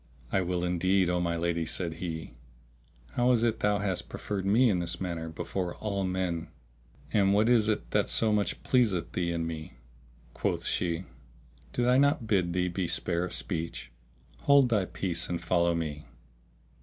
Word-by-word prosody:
"I 95 - +2
will 90 -1 -1
indeed, 90 +1 +2
O 90 - +1
my 85 -1 0
lady," 85 0 0
said 80 0 -3
he, 80 -6 -5 0.8
"how 125 +1 +2
is 115 -1 +2
it 115 -2 +1
thou 105 0 +2
hast 95 -2 -2
preferred 100 -2 -4
me 115 +6 +5
in 95 -6 +2
this 85 -1 -2
matter 85 -3 -4
before 90 +2 -4
all 100 -2 -2
men 90 -3 -2 0.6
and 100 -1 +4
what 105 +2 +3
is 115 -3 +4
it - - -2
that - - +1
so 110 -2 +4
much 105 -1 -1
pleaseth 110 -9 +2
thee 85 -1 -1
in 85 -1 -2
me?" 80 -3 -6 0.6
Quoth - - -2
she, 85 0 0 0.7
"Did 120 - 0
I 125 +1 +4
not 140 -4 +3
bid 95 -5 +1
thee 90 0 +1
be 90 0 -2
spare 85 +1 0
of 90 - -4
speech? 80 -6 -4 0.5
Hold 140 -3 +5
thy 105 -5 +2
peace 85 -2 -3
and 85 -1 -1
follow 85 0 +2
me. 75 -3 -4
90 Hz, 175 wpm, -29 LUFS, 85-105 Hz, 0.8 s, me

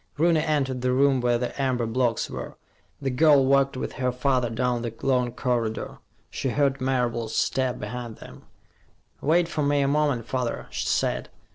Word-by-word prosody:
Rooney 165 +1 +3
entered 135 -5 0
the 125 0 +1
room 135 0 +3
where 120 -1 +2
the 125 +3 -3
amber 130 -3 0
blocks 115 0 0
were. - - -7 0.4
The 135 -2 -2
girl 140 0 +5
walked 135 0 +3
with - - -4
her 125 0 +2
father 125 -1 +1
down 120 +1 -1
the 120 -1 -3
long 125 -2 +2
corridor. 120 -3 -2 0.3
She 135 - -2
heard 135 +1 +1
Marable's 120 -3 -1
step 130 -2 0
behind 115 +1 -6
them. - - -13 0.8
"Wait 165 +4 +3
for 160 -2 -3
me 145 0 +2
a 140 - +2
moment, 140 -5 +1
father," 120 +1 -2
she - - -3
said. - - 0
130 Hz, 170 wpm, -25 LUFS, 120-140 Hz, 0.8 s, girl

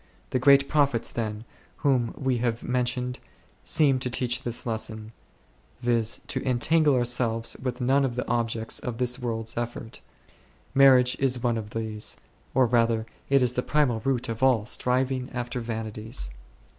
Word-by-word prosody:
The 130 - +1
great 140 +1 +5
prophets, 140 -6 +1
then, 110 -2 -3 0.4
whom 125 -4 +2
we 130 -2 0
have 115 -1 -1
mentioned 125 0 -1 0.4
seem 140 -5 +3
to 125 - -2
teach 125 -1 0
this 120 -1 -2
lesson, 110 -1 -3 0.7
viz. 120 -1 0
to - - -3
entangle 145 +4 +3
ourselves 120 -2 0
with 125 0 -3
none 135 +3 +3
of 125 -3 -1
the 125 - -3
objects 115 -1 0
of 120 -3 -5
this 125 +1 -1
world's 115 -2 -3
effort; 120 -1 -5 0.7
marriage 130 -2 +6
is 130 -3 0
one 120 -2 +2
of 110 -2 -5
these, 110 -1 -3 0.4
or 130 -1 +5
rather 115 -1 +2 0.2
it 140 -1 +4
is 125 -1 +2
the 125 - 0
primal 140 -5 +1
root 130 +1 -1
of 115 0 -5
all 125 -5 +3
striving 125 +2 0
after 120 0 -3
vanities. 110 - -4
120 Hz, 155 wpm, -26 LUFS, 115-130 Hz, 0.7 s, marriage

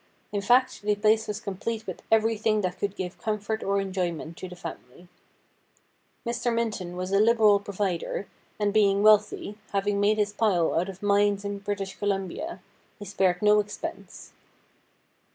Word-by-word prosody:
In 205 -1 -1
fact, 250 +5 +3
the 210 0 +1
place 215 +2 +2
was 210 0 -3
complete 215 +3 -4
with - - -6
everything 220 -1 +2
that 185 -2 -3
could 200 -1 -2
give 180 -1 -5
comfort 215 0 -2
or 200 0 +1
enjoyment 180 -4 -3
to 185 - -7
the 180 - -9
family. 170 -2 -10 1.2
Mr. 235 0 -1
Minton 215 -6 -2
was 185 +1 -3
a 195 - +4
liberal 215 -2 +5
provider, 200 -1 -3 0.3
and 205 -1 0
being 200 -2 +3
wealthy 210 0 +3
— - - -31
having 200 0 +1
made 210 +1 +3
his 205 -1 0
pile 195 -7 +2
out 175 +4 0
of 190 +1 -10
mines 205 0 +2
in 200 0 -3
British 200 -1 -4
Columbia 200 - -3 0.2
— - - -37
he 205 - -9
spared 190 -1 +1
no 210 0 +6
expense. 205 0 -6
205 Hz, 165 wpm, -26 LUFS, 195-215 Hz, 1.2 s, no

